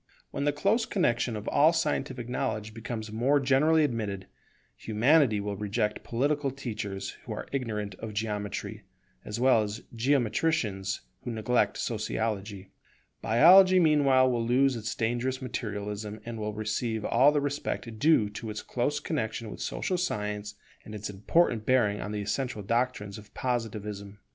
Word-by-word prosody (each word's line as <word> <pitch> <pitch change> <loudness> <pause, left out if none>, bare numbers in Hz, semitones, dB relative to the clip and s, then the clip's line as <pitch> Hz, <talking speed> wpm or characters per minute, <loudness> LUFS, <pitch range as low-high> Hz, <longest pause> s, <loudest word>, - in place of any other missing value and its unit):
When 140 - -2
the 145 - +3
close 205 +10 +1
connexion 120 - +1
of 105 0 -6
all 155 +3 +5
scientific 135 -6 -1
knowledge 125 -4 -3
becomes 110 -1 -6
more 130 +6 +2
generally 145 +4 +4
admitted, 105 -8 -2 0.5
Humanity 115 +1 +3
will 100 0 -3
reject 105 +1 -2
political 140 +4 0
teachers 110 -7 -5
who - - -4
are - - -6
ignorant 105 -7 -3
of 110 -2 -7
Geometry, 105 -1 -3 0.4
as 105 +2 -5
well 125 -3 +5
as 105 +2 -4
geometricians 115 -5 0 0.2
who 125 - -5
neglect 115 +1 +1
Sociology. 105 -3 -3 0.5
Biology 185 - +7
meanwhile 140 -5 +4
will 120 -2 0
lose 130 +3 +3
its 115 0 -4
dangerous 120 +3 -1
materialism, 105 -4 -5
and 115 -1 -6
will 105 -1 -3
receive 110 +1 -2
all 130 +5 +5
the 150 - +1
respect 140 -5 -3
due 150 -6 +4
to 110 +2 -6
its 105 0 -5
close 145 +4 -1
connexion 115 -7 -3
with - - -8
social 180 -2 -2
science 105 - -3 0.3
and 105 - -9
its 105 0 -5
important 110 - +1
bearing 110 -5 +2
on 105 - -5
the 105 -1 -3
essential 105 +1 -2
doctrines 115 -2 -1
of 105 - -16
Positivism. 105 -5 -3
115 Hz, 150 wpm, -28 LUFS, 105-135 Hz, 0.5 s, Biology